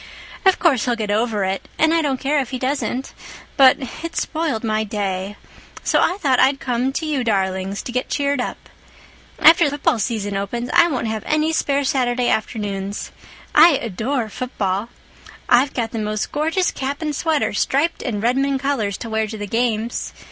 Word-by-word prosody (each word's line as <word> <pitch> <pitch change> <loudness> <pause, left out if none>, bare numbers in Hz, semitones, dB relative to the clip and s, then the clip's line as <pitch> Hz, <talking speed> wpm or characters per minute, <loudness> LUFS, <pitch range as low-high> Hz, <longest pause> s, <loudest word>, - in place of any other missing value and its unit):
Of 380 - +5
course 275 - +2
he'll 245 -2 +1
get 215 -3 -3
over 215 -1 0
it—and 195 +11 0
I 330 - +3
don't 275 -4 -1
care 290 +2 +1
if 260 -3 -2
he 260 - -3
doesn't—but 265 0 0 0.3
it 335 0 -5
spoiled 310 -9 -2
my 215 -1 0
day. 200 -2 -3 0.5
So - - +2
I 365 - +1
thought 270 -9 +2
I'd 270 +1 +4
come 250 +1 -1
to 320 - -2
you 290 -5 -1
darlings 195 -2 -1
to - - -6
get 250 +1 -2
cheered 280 -2 0
up. - - -6 0.7
After 330 +1 +7
the 290 0 -1
football 260 -5 +1
season 205 -2 -2
opens 235 +5 -3
I 345 0 +6
won't 260 -8 -2
have 220 -1 -2
any 310 +1 +1
spare 285 -2 +1
Saturday 250 -2 +1
afternoons. 205 -2 -3 0.4
I 325 +2 +8
adore 235 +1 -2
football. 210 -3 -3 0.6
I've 255 +3 +3
got 230 -2 -2
the 225 - -3
most 215 0 -2
gorgeous 325 +5 0
cap 280 +3 -4
and 300 -1 -2
sweater 315 -4 0
striped 285 +10 0
in 215 -6 -3
Redmond 270 +4 +1
colors 255 -8 -1
to 230 - -7
wear 220 0 0
to 220 +1 -7
the 205 - -4
games. 230 +1 -1
250 Hz, 175 wpm, -20 LUFS, 215-285 Hz, 0.7 s, I